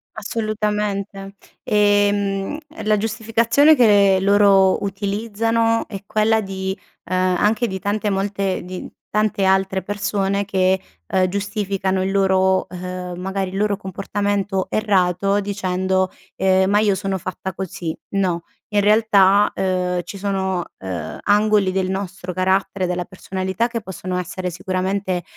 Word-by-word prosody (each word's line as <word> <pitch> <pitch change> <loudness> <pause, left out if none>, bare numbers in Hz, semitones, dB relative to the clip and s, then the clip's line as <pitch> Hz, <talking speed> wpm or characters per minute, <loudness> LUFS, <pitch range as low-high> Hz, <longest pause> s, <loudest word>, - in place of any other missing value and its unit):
Assolutamente. 210 -2 -3 0.3
E, 205 -2 +3
mhmm, 200 +5 -2 0.3
la 215 0 +3
giustificazione 225 +7 +3
che 205 -6 +5
loro 200 -1 +4
utilizzano 225 +3 0
è 195 -3 -7
quella 220 +2 +2
di, 190 -1 -4 0.3
ehm, 185 0 +1
anche 215 +4 +2
di 190 -3 -4
tante 205 +2 -1
molte 195 -1 -1
di 180 +1 -7 0.2
tante 210 -1 +1
altre 190 0 +2
persone 200 0 -1
che, 190 -1 +2 0.3
ehm, 185 -1 +2
giustificano 195 -1 -1
il 190 - -1
loro, 190 -1 +2
ehm, 180 0 -6
magari 190 +1 -3
il 190 - -5
loro 205 0 +1
comportamento 195 0 -2
errato 195 -2 +1
dicendo, 190 -2 -1 0.2
ehm: 190 0 +3
"Ma 205 +1 +4
io 210 -2 +3
sono 195 0 -2
fatta 185 +1 -5
così"; 175 -3 -5
no, 185 -4 0 0.3
in 205 -1 +2
realtà, 205 -1 +4
ehm, 180 -1 0
ci 200 - -8
sono, 190 -2 -1
ehm, 95 -2 -5
angoli 205 -1 +3
del 185 0 -1
nostro 190 -1 -4
carattere, 190 +1 0
della 180 0 -2
personalità 190 +4 -3
che 230 -1 -3
possono 185 -2 -5
essere 180 +1 -3
sicuramente, 185 +1 -2
195 Hz, 130 wpm, -21 LUFS, 185-205 Hz, 0.3 s, che